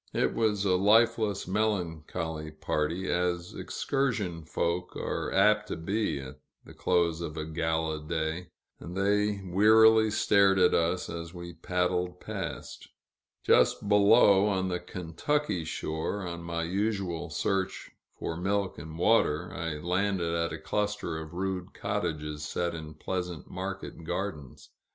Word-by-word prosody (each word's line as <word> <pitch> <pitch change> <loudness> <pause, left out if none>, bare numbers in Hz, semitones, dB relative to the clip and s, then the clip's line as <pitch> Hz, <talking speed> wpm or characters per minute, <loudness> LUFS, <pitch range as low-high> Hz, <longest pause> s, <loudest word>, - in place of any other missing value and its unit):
It - - +2
was 105 -3 +1
a 90 -2 +3
lifeless, 105 0 +3
melancholy 85 -6 -2
party, 75 +4 -2
as 90 0 -1
excursion 110 - -2
folk 85 +3 -2
are - - -3
apt 105 +2 +4
to - - -3
be 100 -1 -1
at 65 -1 -9 0.3
the - - -12
close 85 -2 +1
of 80 -2 -5
a 80 - -3
gala 80 -1 -1
day, 80 +2 -2 0.3
and 90 +2 -7
they 105 +1 +1
wearily 110 +4 +6
stared 100 -2 +4
at 90 -1 +5
us 85 +2 +1
as 85 +1 -6
we 85 0 -7
paddled 90 0 -1
past. - - -6 0.6
Just - - +3
below, 105 -1 +6
on 95 -2 0
the 90 -1 -1
Kentucky 90 - -2
shore, 80 +5 -3
on 85 -1 -5
my 85 0 -3
usual 95 -2 -1
search 95 +5 -2 0.3
for 80 - -3
milk 95 +2 -1
and 80 0 -8
water, 90 -4 +2
I 85 -3 -3
landed 90 +1 0
at 85 0 0
a - - -4
cluster 105 -6 -2
of 80 +1 -9
rude 95 -1 -3
cottages 75 -1 -3
set 85 +4 -2
in 80 -2 -7
pleasant 90 -1 -4
market - - -6
gardens. 80 -7 -5
90 Hz, 135 wpm, -29 LUFS, 80-100 Hz, 0.6 s, wearily